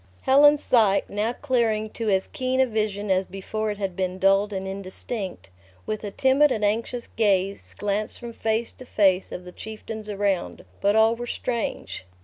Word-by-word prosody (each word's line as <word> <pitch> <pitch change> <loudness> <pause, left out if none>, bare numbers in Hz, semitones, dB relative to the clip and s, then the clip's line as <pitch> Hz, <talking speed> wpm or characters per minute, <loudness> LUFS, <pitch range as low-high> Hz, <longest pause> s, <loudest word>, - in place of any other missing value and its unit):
Helen's 290 +2 +6
sight, 215 -5 +3
now 210 +3 0
clearing 230 -6 0
to 225 -2 -3
as 190 -1 +2
keen 260 -3 -2
a 265 - +6
vision 210 -3 -2
as 190 0 +2
before 215 +3 -4
it 205 - -3
had 195 -3 -3
been 185 0 -2
dulled 195 +2 +3
and 190 -1 -4
indistinct, 190 - -5 0.3
with 215 0 -3
a 205 - -3
timid 265 +7 +3
and 215 -3 0
anxious 230 +3 -1
gaze 195 -3 0
glanced 205 +2 -2
from 235 -1 -8
face 225 +1 -1
to 255 - -12
face 190 -4 +2
of 180 - -7
the 180 - -9
chieftains 220 +1 -7
around; 200 -3 -1 0.2
but 200 +1 +3
all 220 +1 +5
were 240 +1 -6
strange. 235 - -3
215 Hz, 175 wpm, -25 LUFS, 195-230 Hz, 0.3 s, Helen's